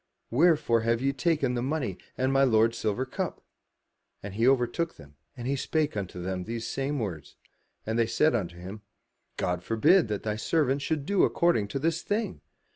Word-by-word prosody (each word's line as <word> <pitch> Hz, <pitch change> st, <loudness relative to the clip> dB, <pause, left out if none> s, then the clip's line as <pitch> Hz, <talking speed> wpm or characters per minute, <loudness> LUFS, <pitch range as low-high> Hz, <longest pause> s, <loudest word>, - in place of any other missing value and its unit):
Wherefore 145 Hz, -4 st, +3 dB
have 115 Hz, +1 st, +1 dB
ye 135 Hz, +2 st, 0 dB
taken 140 Hz, -3 st, +1 dB
the 120 Hz, -, -1 dB
money 130 Hz, -, -2 dB, 0.2 s
and 130 Hz, +1 st, +1 dB
my 135 Hz, 0 st, +4 dB
lord's 115 Hz, -2 st, +4 dB
silver 110 Hz, +4 st, -1 dB
cup?" 130 Hz, -, -4 dB, 0.8 s
And 100 Hz, -1 st, -6 dB
he 115 Hz, +4 st, +2 dB
overtook 135 Hz, +6 st, +1 dB
them, 70 Hz, -1 st, -15 dB, 0.2 s
and 120 Hz, -, -6 dB
he 140 Hz, -, +1 dB
spake 150 Hz, +1 st, -1 dB
unto 95 Hz, -3 st, -4 dB
them 90 Hz, 0 st, -3 dB
these 115 Hz, 0 st, -4 dB
same 140 Hz, +2 st, -2 dB
words. 95 Hz, -, -5 dB, 0.5 s
And 110 Hz, +2 st, -1 dB
they 115 Hz, -, +3 dB
said 155 Hz, +6 st, +3 dB
unto 90 Hz, -7 st, -2 dB
him, 95 Hz, +4 st, -8 dB, 0.6 s
"God 90 Hz, -1 st, -1 dB
forbid 115 Hz, -, +4 dB
that 105 Hz, -1 st, -3 dB
thy 105 Hz, -1 st, -2 dB
servants 140 Hz, +2 st, +1 dB
should 150 Hz, -3 st, -1 dB
do 200 Hz, +2 st, +2 dB
according 170 Hz, -12 st, +2 dB
to 135 Hz, -, -4 dB
this 165 Hz, +4 st, 0 dB
thing! 215 Hz, +2 st, -2 dB
120 Hz, 185 wpm, -28 LUFS, 105-145 Hz, 0.8 s, my